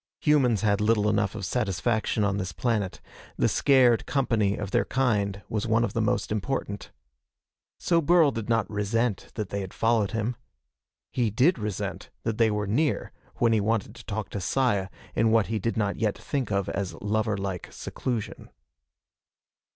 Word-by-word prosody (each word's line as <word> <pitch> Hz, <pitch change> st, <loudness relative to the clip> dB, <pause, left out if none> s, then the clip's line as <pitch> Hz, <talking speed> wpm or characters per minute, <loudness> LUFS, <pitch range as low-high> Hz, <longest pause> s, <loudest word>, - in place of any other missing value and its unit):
Humans 130 Hz, -9 st, +3 dB
had 100 Hz, -1 st, +2 dB
little 105 Hz, -1 st, +3 dB
enough 105 Hz, -1 st, +1 dB
of 105 Hz, -4 st, -4 dB
satisfaction 110 Hz, 0 st, 0 dB
on 100 Hz, -1 st, +1 dB
this 95 Hz, -3 st, -3 dB
planet. 105 Hz, -6 st, -1 dB, 0.4 s
The -, -, +3 dB
scared 130 Hz, -4 st, +4 dB
company 110 Hz, -7 st, +1 dB
of 100 Hz, -2 st, -4 dB
their -, -, +2 dB
kind 100 Hz, -7 st, 0 dB
was 110 Hz, 0 st, -2 dB
one 115 Hz, +1 st, +3 dB
of -, -, -1 dB
the 115 Hz, -, 0 dB
most 110 Hz, -, 0 dB
important. 105 Hz, -2 st, -3 dB, 0.9 s
So 170 Hz, -1 st, +2 dB
Burl 165 Hz, -1 st, +5 dB
did 115 Hz, -3 st, -5 dB
not 115 Hz, -2 st, +2 dB
resent 105 Hz, +1 st, -1 dB
that 105 Hz, -5 st, -3 dB
they 100 Hz, -, -2 dB
had 95 Hz, -, -7 dB
followed 115 Hz, -3 st, +2 dB
him. 115 Hz, +2 st, -2 dB, 0.7 s
He 120 Hz, -3 st, +1 dB
did 130 Hz, -, +3 dB
resent 100 Hz, -3 st, -4 dB
that 115 Hz, -1 st, -2 dB
they 115 Hz, -1 st, +5 dB
were 105 Hz, 0 st, -1 dB
near 130 Hz, +10 st, 0 dB, 0.2 s
when 115 Hz, -1 st, +3 dB
he 110 Hz, -, +3 dB
wanted 105 Hz, 0 st, 0 dB
to 120 Hz, -, -12 dB
talk 105 Hz, -1 st, -4 dB
to 100 Hz, -, -4 dB
Saya 105 Hz, -5 st, +1 dB, 0.3 s
in 115 Hz, -, +3 dB
what 110 Hz, -2 st, +4 dB
he 110 Hz, -, 0 dB
did 115 Hz, +3 st, -2 dB
not 100 Hz, -2 st, 0 dB
yet 105 Hz, -2 st, 0 dB
think 135 Hz, -6 st, -3 dB
of 100 Hz, -2 st, 0 dB
as 100 Hz, -2 st, -3 dB
lover 110 Hz, 0 st, -1 dB
like 95 Hz, -2 st, -4 dB
seclusion. 120 Hz, -5 st, -4 dB
110 Hz, 175 wpm, -27 LUFS, 100-120 Hz, 0.9 s, Burl